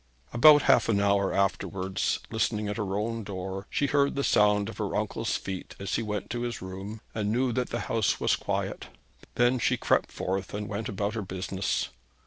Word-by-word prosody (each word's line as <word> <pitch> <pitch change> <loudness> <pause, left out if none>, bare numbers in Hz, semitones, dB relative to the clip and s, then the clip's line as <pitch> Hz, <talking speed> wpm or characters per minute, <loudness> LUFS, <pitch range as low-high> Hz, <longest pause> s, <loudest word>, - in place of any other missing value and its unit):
About 145 +4 +8
half - - +4
an 100 -3 +3
hour 100 -1 +2
afterwards, 95 0 0
listening 110 -1 0
at 105 - -3
her 100 -3 -2
own 115 +2 -2
door, 95 0 -5
she 145 - 0
heard 140 0 +2
the 140 - 0
sound 105 -3 +3
of 115 - -8
her 105 -2 -2
uncle's 105 +2 -1
feet 95 -1 -6
as 100 -1 -4
he - - +1
went 105 -2 -4
to 120 +1 -2
his 120 -2 -3
room, 95 +4 -7
and 105 -1 -1
knew 125 +2 +1
that 125 +1 -1
the 120 - -2
house 110 -3 0
was - - +2
quiet. - - -3 0.5
Then 125 +1 +3
she - - +2
crept - - +1
forth, 95 +1 -3
and 105 0 -4
went 110 +3 -4
about 100 0 -2
her 110 - -2
business. 95 0 -2
105 Hz, 195 wpm, -28 LUFS, 100-115 Hz, 0.5 s, About